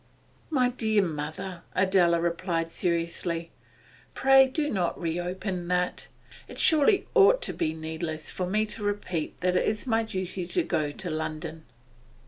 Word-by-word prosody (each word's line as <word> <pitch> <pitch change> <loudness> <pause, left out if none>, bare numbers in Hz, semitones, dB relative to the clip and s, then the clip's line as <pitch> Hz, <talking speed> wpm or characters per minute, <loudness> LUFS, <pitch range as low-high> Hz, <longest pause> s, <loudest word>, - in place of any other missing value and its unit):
'My 255 -6 +2
dear 220 -4 +1
mother,' 165 +3 -5
Adela 185 -3 +4
replied 170 -1 -1
seriously, 170 0 -2 0.6
'pray 270 0 +6
do 295 +3 -1
not 185 -10 -1
reopen 175 +2 -3
that. 180 0 -1 0.4
It - - -10
surely 335 +6 +4
ought 465 +3 +6
to - - +1
be 155 0 -1
needless 160 0 -5
for 180 - -3
me 215 +4 +1
to 215 0 -6
repeat 205 -6 -3
that 180 0 +1
it - - +3
is 215 +2 -1
my 225 -3 +2
duty 185 -4 -4
to 355 - +1
go 150 - -1
to 180 +4 -5
London. 155 0 -4
180 Hz, 145 wpm, -27 LUFS, 165-215 Hz, 0.6 s, pray